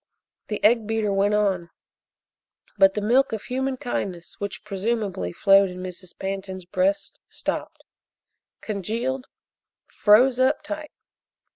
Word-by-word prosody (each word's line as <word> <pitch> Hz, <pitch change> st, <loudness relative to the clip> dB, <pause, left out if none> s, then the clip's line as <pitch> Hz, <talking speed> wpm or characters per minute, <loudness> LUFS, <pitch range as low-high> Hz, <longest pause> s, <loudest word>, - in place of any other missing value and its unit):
The 210 Hz, -, -4 dB
egg 220 Hz, 0 st, +4 dB
beater 220 Hz, -2 st, 0 dB
went 200 Hz, +1 st, +2 dB
on, 190 Hz, -5 st, +1 dB, 1.1 s
but 195 Hz, -1 st, +5 dB
the 210 Hz, -, -1 dB
milk 250 Hz, +4 st, +3 dB
of 220 Hz, -, -3 dB
human 265 Hz, +1 st, -2 dB
kindness 185 Hz, -8 st, -4 dB
which, 200 Hz, -1 st, -5 dB
presumably, 200 Hz, -, -2 dB
flowed 195 Hz, -, +5 dB
in 180 Hz, -, -8 dB
Mrs. 185 Hz, 0 st, -8 dB
Pantin's 190 Hz, -1 st, -5 dB
breast 290 Hz, +10 st, 0 dB
stopped -, -, -4 dB, 0.8 s
congealed 230 Hz, +6 st, -3 dB, 0.6 s
froze 245 Hz, +5 st, +4 dB
up 265 Hz, +4 st, +2 dB
tight. 305 Hz, 0 st, -5 dB
210 Hz, 120 wpm, -24 LUFS, 195-250 Hz, 1.1 s, but